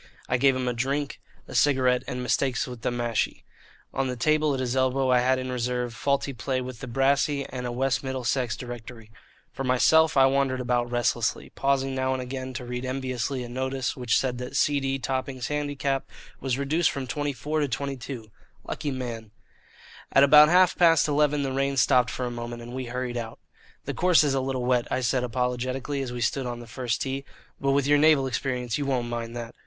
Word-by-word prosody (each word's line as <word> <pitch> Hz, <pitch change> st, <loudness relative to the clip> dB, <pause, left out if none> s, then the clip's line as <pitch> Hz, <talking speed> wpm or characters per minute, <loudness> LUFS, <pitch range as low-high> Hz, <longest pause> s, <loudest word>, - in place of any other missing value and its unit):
I 125 Hz, -, +1 dB
gave 135 Hz, +1 st, +4 dB
him 130 Hz, -1 st, -2 dB
a 125 Hz, -, +1 dB
drink, 135 Hz, +4 st, -2 dB, 0.3 s
a -, -, -10 dB
cigarette, 130 Hz, -3 st, +3 dB
and 125 Hz, 0 st, -4 dB
Mistakes 130 Hz, 0 st, +1 dB
with 125 Hz, -3 st, -8 dB
the -, -, 0 dB
Mashie. 120 Hz, -2 st, -1 dB, 0.5 s
On 135 Hz, 0 st, 0 dB
the 125 Hz, -, -3 dB
table 155 Hz, +5 st, +2 dB
at -, -, -4 dB
his 125 Hz, -1 st, -1 dB
elbow 130 Hz, 0 st, +2 dB
I 125 Hz, -, +5 dB
had 130 Hz, +1 st, +2 dB
in 130 Hz, 0 st, -4 dB
reserve 125 Hz, -1 st, -2 dB
Faulty 140 Hz, +2 st, 0 dB
Play 130 Hz, +2 st, -2 dB
with 125 Hz, -2 st, -6 dB
the 135 Hz, -, -7 dB
Brassy 140 Hz, +3 st, +1 dB
and 125 Hz, -1 st, -4 dB
a -, -, -3 dB
West 130 Hz, +2 st, 0 dB
Middlesex 130 Hz, -2 st, -1 dB
Directory. 120 Hz, -2 st, -9 dB, 0.4 s
For 135 Hz, -, -4 dB
myself 160 Hz, +5 st, +4 dB
I 135 Hz, -, +7 dB
wandered 135 Hz, -1 st, +1 dB
about 120 Hz, -1 st, 0 dB
restlessly, 120 Hz, -1 st, 0 dB
pausing 135 Hz, -1 st, 0 dB
now 130 Hz, 0 st, 0 dB
and 130 Hz, -, -2 dB
again 130 Hz, +1 st, -5 dB
to 125 Hz, -, -5 dB
read 125 Hz, +1 st, -4 dB
enviously 130 Hz, 0 st, -2 dB
a -, -, -6 dB
notice 130 Hz, +1 st, -2 dB
which 125 Hz, -3 st, +1 dB
said 125 Hz, -2 st, -1 dB
that 125 Hz, +2 st, -6 dB
C. 145 Hz, +1 st, +3 dB
D. 135 Hz, 0 st, -1 dB
Topping's 130 Hz, -1 st, -3 dB
handicap 145 Hz, -2 st, -2 dB, 0.3 s
was 130 Hz, -2 st, -1 dB
reduced 155 Hz, +5 st, +2 dB
from 135 Hz, -1 st, -4 dB
24 145 Hz, +3 st, -2 dB
to 145 Hz, -, +1 dB
22. 130 Hz, -4 st, -5 dB, 0.3 s
Lucky 145 Hz, -, -4 dB
man! 120 Hz, -5 st, -5 dB, 0.8 s
At 135 Hz, -, +6 dB
about 150 Hz, +2 st, +8 dB
half 180 Hz, +1 st, +5 dB
past 165 Hz, -3 st, +5 dB
eleven 150 Hz, -1 st, +2 dB
the 135 Hz, -, -2 dB
rain 135 Hz, +1 st, 0 dB
stopped 125 Hz, 0 st, +4 dB
for 125 Hz, -1 st, -3 dB
a 120 Hz, -, -3 dB
moment, 120 Hz, 0 st, -6 dB
and 120 Hz, +1 st, -9 dB
we 130 Hz, 0 st, -4 dB
hurried 125 Hz, 0 st, -3 dB
out. 115 Hz, -1 st, -5 dB, 0.5 s
"The -, -, -3 dB
course 180 Hz, -3 st, +4 dB
is 145 Hz, -2 st, +1 dB
a 135 Hz, -, +1 dB
little 130 Hz, -1 st, -2 dB
wet," 125 Hz, -1 st, +2 dB
I -, -, 0 dB
said 125 Hz, +1 st, +1 dB
apologetically, 125 Hz, +3 st, -2 dB
as 130 Hz, -2 st, -4 dB
we 120 Hz, 0 st, -5 dB
stood 130 Hz, +3 st, 0 dB
on 120 Hz, -1 st, -4 dB
the 120 Hz, -, -9 dB
first 115 Hz, 0 st, -2 dB
tee, 135 Hz, 0 st, -3 dB, 0.4 s
"but 135 Hz, 0 st, +1 dB
with 140 Hz, -1 st, +2 dB
your 145 Hz, +1 st, +4 dB
naval 150 Hz, -3 st, +5 dB
experience 125 Hz, -1 st, -2 dB
you 140 Hz, -, -2 dB
won't 125 Hz, -3 st, 0 dB
mind 120 Hz, 0 st, -4 dB
that. 120 Hz, -1 st, -6 dB
130 Hz, 205 wpm, -26 LUFS, 125-140 Hz, 0.8 s, about